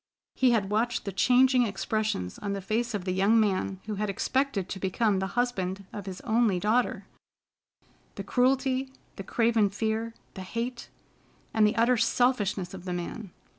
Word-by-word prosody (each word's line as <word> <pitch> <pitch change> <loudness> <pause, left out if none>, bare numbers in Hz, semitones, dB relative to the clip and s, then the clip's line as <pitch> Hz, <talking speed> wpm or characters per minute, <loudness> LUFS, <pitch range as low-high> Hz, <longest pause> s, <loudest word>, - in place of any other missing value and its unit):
He 260 - +3
had 210 -4 +1
watched 235 +3 0
the 200 - -3
changing 255 +6 +4
expressions 205 - -2
on 200 -1 -3
the 200 - -3
face 220 +4 -1
of 190 -3 -4
the 185 - -1
young 200 +5 +3
man 195 -2 0
who 210 -2 -4
had 210 - -1
expected 225 0 -1
to 190 - -6
become 195 +2 +1
the 190 - -1
husband 200 -6 -1
of 205 -2 -7
his 185 -1 -6
only 220 -5 +2
daughter: 220 +6 +1 1.1
the - - -5
cruelty, 260 +1 +1 0.3
the 195 - -5
craven 225 0 +2
fear, 220 +3 -2 0.2
the 190 - -7
hate, 235 +5 -5 0.6
and 215 -1 +4
the 210 - 0
utter 235 +2 +3
selfishness 215 -6 +1
of 185 -1 -9
the 180 - -3
man! 180 +4 -5
215 Hz, 170 wpm, -28 LUFS, 195-240 Hz, 1.1 s, changing